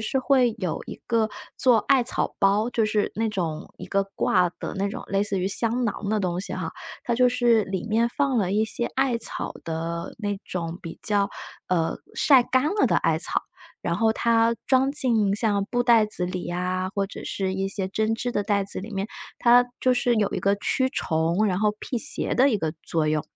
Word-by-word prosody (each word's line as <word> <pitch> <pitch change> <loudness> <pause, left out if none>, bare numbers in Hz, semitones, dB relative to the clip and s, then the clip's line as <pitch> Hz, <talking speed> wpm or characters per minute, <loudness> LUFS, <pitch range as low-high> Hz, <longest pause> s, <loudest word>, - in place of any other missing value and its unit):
是 220 +5 -1
会 255 -3 +3
有 185 -6 -3
一 - - -6
个 225 -2 +1 0.3
做 250 -3 +5
艾 260 +4 +3
草 240 - -1
包， 205 +4 +2
就 225 -3 +1
是 210 -1 0
那 225 +1 0
种 170 -7 -4
一 - - -8
个 195 0 0
挂 180 -1 +2
的 - - -5
那 200 +1 -1
种 - - -6
类 195 0 0
似 205 -1 -1
于 185 - -1
香 230 +5 +2
囊 205 -2 -3
的 215 +1 +1
东 180 -3 -1
西 195 - -5
哈。 - - -4 0.3
它 240 - 0
就 250 +1 +4
是 240 -3 +3
里 190 +1 -4
面 225 +2 +2
放 270 0 0
了 190 -4 0
一 215 +2 +2
些 235 +2 -2
艾 265 -3 +1
草 - - -2
的 165 +1 -4
那 205 -2 -3
种 170 -1 -4
比 165 - -8
较 205 -2 +2 0.4
呃， 170 -3 0 0.2
晒 270 -4 +5
干 260 +2 +1 0.2
了 - - +5
的 - - +2
艾 - - +1
草， - - +1 0.4
然 - - -1
后 220 -1 +3
它 230 0 +2
装 265 0 +3
进 230 -8 +2
像 210 -2 +1
布 245 0 +1
袋 230 -3 +5
子 185 -4 -2
里 180 0 -4
呀， 180 +1 -2
或 200 -2 0
者 - - -9
是 190 -1 -2
一 195 0 -1
些 195 -1 -2
针 220 +3 0
织 245 +2 -2
的 205 - 0
袋 200 -1 0
子 195 - -5
里 205 +4 -8
面， 195 +1 -2 0.3
它 245 +1 +6 0.2
就 255 - +3
是 245 -1 +2
有 210 -3 +1
一 - - -1
个 200 +2 +2
驱 260 +5 0
虫， 165 - 0
然 185 -3 0
后 210 0 +3
辟 245 - -3
邪 - - 0
的 265 +3 +5
一 220 - +2
个 160 -5 -2
作 160 -2 -1
用。 155 -1 +1
210 Hz, 235 characters per minute, -25 LUFS, 190-235 Hz, 0.4 s, 它